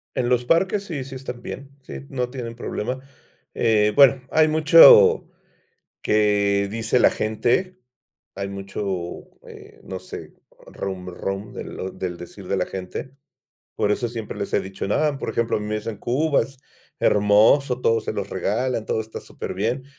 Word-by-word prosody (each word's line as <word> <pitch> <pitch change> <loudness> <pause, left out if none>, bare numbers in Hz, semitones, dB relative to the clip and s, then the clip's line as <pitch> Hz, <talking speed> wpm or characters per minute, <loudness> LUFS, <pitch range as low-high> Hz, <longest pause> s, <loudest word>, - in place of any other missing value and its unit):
En 120 - 0
los 125 -1 +1
parques 190 +7 +2
sí, 155 -9 -5
sí 135 0 -9
están 125 -2 -7
bien, 135 +3 -8
sí, 135 - -9
no 125 -2 -2
tienen 120 -3 -6
problema, 125 +2 -4 0.5
eh, 105 -2 +2
bueno, 135 -2 +6
hay 155 0 +4
mucho 460 - +7 0.7
que 100 -1 +2
dice 115 +2 0
la - - +6
gente, 120 - 0 0.6
hay 100 0 -4
mucho, 100 +1 -6 0.6
eh, - - -14
no - - -6
sé, - - -9 0.3
rum, 95 -2 -6
rum 95 +3 -5
del 95 - -7
del 90 -2 -3
decir 90 +2 -11
de 100 - 0
la 90 - 0
gente. 95 +7 -6 0.6
Por 105 - +1
eso 120 +2 -1
siempre 115 -2 -6
les 100 - -4
he - - +3
dicho: 95 0 -6
"No". 150 +4 +1
Por - - -4
ejemplo, 115 0 0
a - - -3
mí 105 - -5
me 105 0 -2
dicen: 105 -1 -5
"Cuba 140 +7 +1
es 135 -1 -11 0.4
hermoso, 110 +6 +4
todo 115 -2 +2
se 110 - -4
los 100 -2 -4
regalan, 110 +5 -1
todo - - 0
está 110 0 -7
superbién", 120 +7 -4
115 Hz, 165 wpm, -23 LUFS, 100-135 Hz, 0.7 s, mucho